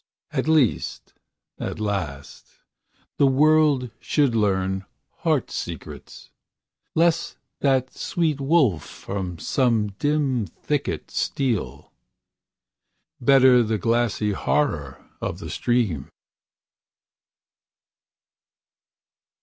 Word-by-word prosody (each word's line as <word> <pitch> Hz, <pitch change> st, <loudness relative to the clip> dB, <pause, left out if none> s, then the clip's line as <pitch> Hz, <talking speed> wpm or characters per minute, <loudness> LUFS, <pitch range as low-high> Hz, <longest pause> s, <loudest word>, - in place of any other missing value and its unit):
And -, -, -1 dB
lest, 155 Hz, -7 st, +1 dB, 0.5 s
at -, -, -4 dB
last, 90 Hz, -10 st, -4 dB, 0.6 s
the 140 Hz, -, +5 dB
world 145 Hz, -2 st, +3 dB
should 145 Hz, -5 st, +1 dB
learn 95 Hz, -3 st, 0 dB, 0.3 s
heart -, -, 0 dB
secrets; -, -, -7 dB, 0.6 s
Lest 170 Hz, +1 st, +2 dB, 0.2 s
that 130 Hz, -2 st, +1 dB
sweet 155 Hz, -5 st, -1 dB
wolf 135 Hz, -, +3 dB
from 95 Hz, -3 st, -6 dB
some 115 Hz, -, +1 dB
dim 140 Hz, -7 st, +1 dB
thicket 145 Hz, -, -3 dB
steal; 130 Hz, -, -2 dB, 1.3 s
Better 130 Hz, -1 st, +6 dB
the 110 Hz, -1 st, 0 dB
glassy 115 Hz, 0 st, +1 dB
horror 75 Hz, -, -1 dB, 0.2 s
of -, -, -3 dB
the -, -, -7 dB
stream. 110 Hz, -, 0 dB
125 Hz, 80 wpm, -24 LUFS, 100-145 Hz, 1.3 s, Better